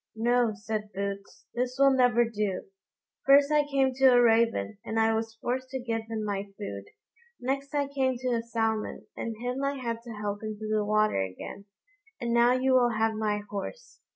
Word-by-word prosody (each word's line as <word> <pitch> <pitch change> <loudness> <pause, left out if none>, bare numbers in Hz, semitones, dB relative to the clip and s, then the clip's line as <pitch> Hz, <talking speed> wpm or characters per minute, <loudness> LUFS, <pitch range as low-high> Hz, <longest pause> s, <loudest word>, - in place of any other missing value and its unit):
"No," 240 0 +2
said 210 0 -4
Boots, 200 0 -5
"this 250 +1 -2
will 275 0 +6
never 245 -2 +4
do; 210 -4 -2 0.6
first 280 +1 +6
I 300 0 +4
came 270 -2 +2
to 270 +1 +2
a 250 -2 +7
raven, 230 -2 +2
and 225 +1 -2
I 225 0 +3
was 225 0 -2
forced 255 +3 -3
to 265 0 -4
give 225 -2 -3
him 220 -1 -3
my 200 -1 -2
food; 100 - -6 0.5
next 275 +3 -3
I 285 -1 +1
came 265 -2 0
to 255 +1 -2
a 235 -2 +1
salmon, 225 -2 -2
and 225 -2 -4
him 250 +3 -3
I 280 0 0
had 235 -3 -4
to 235 -1 -9
help 205 -1 -4
into 215 0 -5
the 215 -1 +1
water 215 - +2
again; 95 - -6 0.5
and 235 -1 -1
now 235 +1 +5
you 260 +1 +2
will 240 -3 +3
have 220 0 +2
my 210 -1 -1
horse. 345 - -7
230 Hz, 190 wpm, -28 LUFS, 215-255 Hz, 0.6 s, a